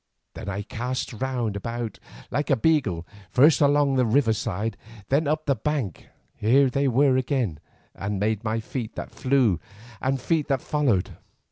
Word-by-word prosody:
Then 100 Hz, -, -6 dB
I 100 Hz, +1 st, -3 dB
cast 125 Hz, +4 st, -4 dB
round 120 Hz, -3 st, -2 dB
about 115 Hz, +2 st, -4 dB, 0.3 s
like 145 Hz, -, -1 dB
a 135 Hz, -, +5 dB
beagle, 110 Hz, -, +1 dB, 0.2 s
first 140 Hz, +1 st, +5 dB
along 145 Hz, -1 st, +4 dB
the 130 Hz, -, +4 dB
river 115 Hz, -1 st, +3 dB
side, 110 Hz, 0 st, -2 dB, 0.3 s
then 145 Hz, +3 st, +2 dB
up 155 Hz, +1 st, 0 dB
the 140 Hz, -, +3 dB
bank. 130 Hz, -, -3 dB, 0.3 s
Here 130 Hz, +5 st, +3 dB
they 140 Hz, +2 st, +1 dB
were 130 Hz, +1 st, +4 dB
again, 125 Hz, -, -1 dB, 0.3 s
and 100 Hz, 0 st, -3 dB
made 105 Hz, 0 st, 0 dB
by 110 Hz, 0 st, -1 dB
feet 115 Hz, 0 st, -5 dB
that -, -, -6 dB
flew 130 Hz, -, +2 dB, 0.4 s
and 135 Hz, +1 st, 0 dB
feet 155 Hz, +4 st, 0 dB
that 135 Hz, -3 st, 0 dB
followed. 130 Hz, -12 st, 0 dB
125 Hz, 160 wpm, -25 LUFS, 110-140 Hz, 0.4 s, a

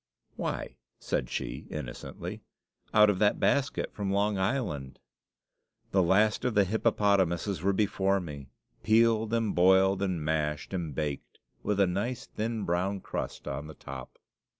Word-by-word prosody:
"Why," -, -, -4 dB, 0.2 s
said 60 Hz, -, -2 dB
she, -, -, -4 dB
innocently, -, -, -6 dB, 0.5 s
"out 105 Hz, 0 st, +6 dB
of 95 Hz, -, -3 dB
that 105 Hz, -1 st, +3 dB
basket 140 Hz, -1 st, +1 dB
from 100 Hz, -2 st, -3 dB
Long 100 Hz, +1 st, +2 dB
Island!" 95 Hz, -, -2 dB, 0.9 s
The 95 Hz, -, +4 dB
last 105 Hz, +5 st, +3 dB
of 125 Hz, -3 st, 0 dB
the 100 Hz, -, +6 dB
hippopotamuses 100 Hz, -4 st, +1 dB
were 100 Hz, +2 st, +2 dB
before 100 Hz, -1 st, +1 dB
me, 70 Hz, -6 st, -8 dB, 0.3 s
peeled, 110 Hz, 0 st, +3 dB
and 115 Hz, -3 st, +1 dB
boiled, 95 Hz, +2 st, +4 dB
and 90 Hz, -6 st, -1 dB
mashed, 75 Hz, +1 st, -1 dB
and 85 Hz, -7 st, -3 dB
baked, 75 Hz, -2 st, -4 dB, 0.2 s
with 105 Hz, -1 st, -1 dB
a 100 Hz, -, +6 dB
nice 115 Hz, +8 st, -2 dB
thin 110 Hz, 0 st, -3 dB
brown 95 Hz, +3 st, 0 dB
crust -, -, -5 dB
on 75 Hz, -, -4 dB
the 80 Hz, -, -10 dB
top. 65 Hz, -1 st, -9 dB
95 Hz, 145 wpm, -29 LUFS, 85-105 Hz, 0.9 s, out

